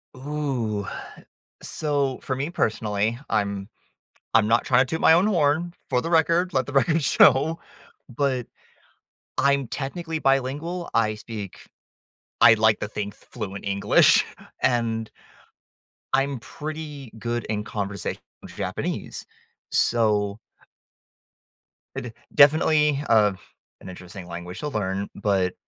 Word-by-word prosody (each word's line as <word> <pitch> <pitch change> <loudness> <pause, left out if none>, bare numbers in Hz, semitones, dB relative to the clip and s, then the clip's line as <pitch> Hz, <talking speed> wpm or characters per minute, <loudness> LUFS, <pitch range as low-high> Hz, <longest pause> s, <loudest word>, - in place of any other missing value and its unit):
Ooh, 130 -7 -2 0.8
so, 140 -4 -1
for 130 - -2
me 140 +5 -3
personally, 110 - -1
I'm 100 -2 -1 0.7
I'm 110 -1 +5
not 115 +1 +3
trying 125 -1 +4
to - - -10
toot 160 +5 -3
my - - +6
own 175 +4 +5
horn, 170 -3 +1 0.2
for 125 -2 +1
the 165 - -3
record, 170 +2 +3
let 130 -3 +1
the 145 - -7
record 155 +3 +2
show, 145 +4 +4 0.6
but, 130 -2 0 0.9
I'm 140 0 +3
technically 160 +6 -4
bilingual, 145 +7 0
I 110 -2 +2
speak 105 -2 -8 0.8
I 115 - +9
like 110 -1 +3
to - - -3
think 105 -1 -5
fluent 100 -4 -8
English, 100 0 +4 0.4
and 115 -3 0 1.0
I'm 135 -1 +1
pretty 150 0 -7
good 120 0 -2
in 105 -1 -2
conversational 100 -3 -4 0.3
Japanese, - - -4 0.5
so 105 -3 +2 1.6
eh, - - -3
d 125 - -7 0.2
definitely, 150 0 +5
uh, 105 -3 +5 0.5
an - - -9
interesting 90 0 -10
language 85 +2 -7
to 150 - -3
learn, 100 -4 -2
but, 95 -3 +1
125 Hz, 120 wpm, -24 LUFS, 105-145 Hz, 1.6 s, I